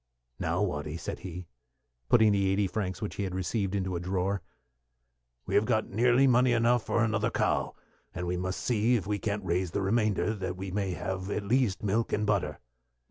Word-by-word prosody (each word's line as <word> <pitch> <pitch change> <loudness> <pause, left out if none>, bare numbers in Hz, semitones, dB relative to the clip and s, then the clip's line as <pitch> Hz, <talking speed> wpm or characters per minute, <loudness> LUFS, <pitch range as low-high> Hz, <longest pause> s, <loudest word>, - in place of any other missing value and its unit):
"Now, - - 0
Watty," 75 +2 -3
said - - -5
he, 90 -1 -7 0.6
putting 110 -3 +6
the 100 -1 +2
eighty 100 +1 +2
francs 95 -1 -3
which 105 - -4
he 100 - -1
had 95 -2 -3
received 95 +2 -1
into 95 -2 -1
a - - -1
drawer, 95 +2 -1 1.0
"we - - -4
have 105 - +4
got 110 -2 0
nearly 120 +5 +4
money 125 -1 +4
enough 120 0 +3
for 115 - +1
another 110 0 +1
cow, - - 0 0.4
and 90 0 -4
we 90 +1 -1
must 95 +2 -3
see 120 +1 +2
if 105 -7 -1
we 105 +1 -1
can't 100 0 -2
raise 90 +1 0
the 100 - -2
remainder, 110 +1 +1
that 95 -3 -4
we 95 0 -5
may 95 -1 -1
have 95 +2 -4
at 105 - -2
least 110 -2 +1
milk 110 +3 0
and 105 - +1
butter." 95 -8 0
100 Hz, 195 wpm, -29 LUFS, 95-110 Hz, 1.0 s, putting